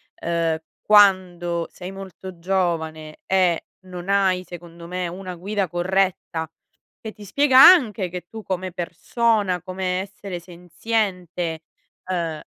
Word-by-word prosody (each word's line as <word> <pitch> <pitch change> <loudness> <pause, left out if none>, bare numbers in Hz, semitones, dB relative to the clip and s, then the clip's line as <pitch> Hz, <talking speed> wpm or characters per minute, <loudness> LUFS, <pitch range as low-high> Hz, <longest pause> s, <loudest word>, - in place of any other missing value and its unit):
ehm, 165 -1 -1 0.2
quando 180 -5 +4
sei 180 +1 -8
molto 190 -2 -10
giovane 165 -4 -2
e 185 -3 +2 0.2
non 180 0 -9
hai 190 -2 +2
secondo 170 -1 -11
me 180 0 -3
una 180 +1 -7
guida 195 +2 -2
corretta 175 -2 -1 0.5
che 220 - -6
ti 210 -1 -13
spiega 265 +5 +4
anche 255 - +7
che 180 0 -7
tu 225 -1 -8
come 185 -1 -3
persona, 185 +2 0
come 185 0 -2
essere 195 -2 -7
senziente, 175 -1 -3 0.4
ehm 170 -4 -3
180 Hz, 120 wpm, -22 LUFS, 170-195 Hz, 0.5 s, anche